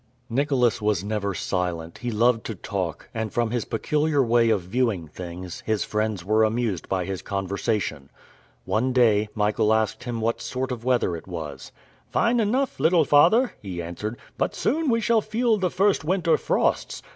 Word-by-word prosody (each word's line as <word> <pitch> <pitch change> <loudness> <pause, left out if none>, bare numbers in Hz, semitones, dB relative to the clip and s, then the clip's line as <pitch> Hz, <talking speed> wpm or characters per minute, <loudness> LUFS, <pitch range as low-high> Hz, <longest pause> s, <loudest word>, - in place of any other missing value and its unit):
Nicholas 125 -3 +2
was 105 -3 +1
never 100 -2 -2
silent, 85 -2 -3
he 125 - -3
loved 115 +1 +2
to 110 - -5
talk, 95 -4 -4
and, 110 -2 -3
from 120 -2 0
his 120 -2 -1
peculiar 150 +4 +1
way 115 -1 +3
of 105 -4 +2
viewing 100 -2 -1
things, 90 +2 -8
his 110 -2 +1
friends 105 -4 -2
were 110 +2 +3
amused 110 -4 -1
by 95 -2 0
his 95 -2 -4
conversation. 100 - -2 0.6
One 125 +4 0
day, 110 -4 +3
Michael 105 0 +2
asked 110 +3 0
him 120 -2 -3
what 115 +1 -1
sort 130 0 -3
of 120 -2 -5
weather 125 -8 +1
it 80 - -9
was. 80 -6 -7 0.4
"Fine 235 +1 +2
enough, 250 +5 0
little 165 -1 +4
father," 200 - +5
he 95 -4 -6
answered, 85 +7 -5 0.2
"but - - 0
soon 310 +2 0
we 230 -1 +2
shall 230 0 +3
feel 220 +1 +1
the 185 -1 +1
first 195 +1 +2
winter 170 -1 +2
frosts. - - 0
110 Hz, 170 wpm, -24 LUFS, 95-140 Hz, 0.6 s, father